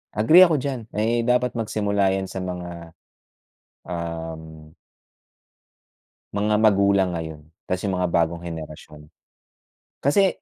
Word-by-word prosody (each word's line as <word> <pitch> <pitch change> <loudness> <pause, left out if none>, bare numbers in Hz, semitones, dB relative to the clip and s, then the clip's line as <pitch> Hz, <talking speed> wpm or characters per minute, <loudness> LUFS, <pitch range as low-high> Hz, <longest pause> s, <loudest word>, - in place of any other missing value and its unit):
Agree 155 +13 +7
ako 165 - +1
diyan, 135 -2 -2 0.2
ay 115 +2 +1
dapat 125 0 +2
magsimula 100 -4 0
yan 95 0 -3
sa 95 - -5
mga, 85 -2 -7 0.9
um 80 -2 -7 1.6
mga 105 +1 +1
magulang 100 -3 +3
ngayon 80 -2 -6 0.3
kasi 90 +2 -2
mga 90 -1 0
bagong 85 0 0
henerasyon. 75 -2 -9 0.9
Kasi 190 +7 +2
95 Hz, 105 wpm, -23 LUFS, 85-110 Hz, 1.6 s, Agree